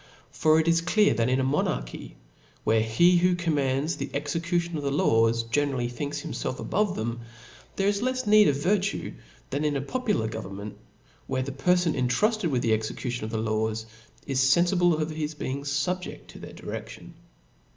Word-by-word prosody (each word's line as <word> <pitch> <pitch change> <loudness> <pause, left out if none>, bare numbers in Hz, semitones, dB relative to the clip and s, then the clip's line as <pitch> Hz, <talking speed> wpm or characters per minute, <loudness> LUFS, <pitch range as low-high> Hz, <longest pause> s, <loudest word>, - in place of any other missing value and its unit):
For 155 0 +3
it 160 - 0
is 165 0 +4
clear, 205 +5 +3
that 115 +1 +1
in 130 +1 +2
a - - +1
monarchy, - - -2 0.5
where 110 0 +3
he 170 +12 +4
who 180 +1 +3
com 170 -2 -1
mands 140 +3 0
the - - -4
execution 165 +4 -1
of 150 - -2
the 140 - -1
laws, 115 -4 +2
generally 125 +1 0
thinks 140 +4 -4
himfelf 130 - -4
above 205 +4 0
them, 115 +2 -3 0.6
there 195 - +1
is 200 0 +1
lefs 255 0 -1
need 210 0 +6
of 145 - +3
virtue 195 +7 0 0.4
than 140 +2 -1
in 150 -1 +1
a 135 - 0
popular 210 - -1
government, 105 -2 -6 0.5
where 130 -1 -1
the 140 - -5
perfon 175 +5 +2
cntrufted 175 - +1
with 130 -4 0
the 115 - +3
execution 110 +2 -3
of - - -5
the 110 - -3
laws, 110 0 -1 0.4
is 135 -2 0
feniible 175 +4 +3
©f 155 0 -2
his 155 0 -3
being 140 -1 -4
fubjeft 145 +6 -3
to - - -11
their - - -10
diredlion. - - -8
145 Hz, 180 wpm, -26 LUFS, 120-175 Hz, 0.6 s, need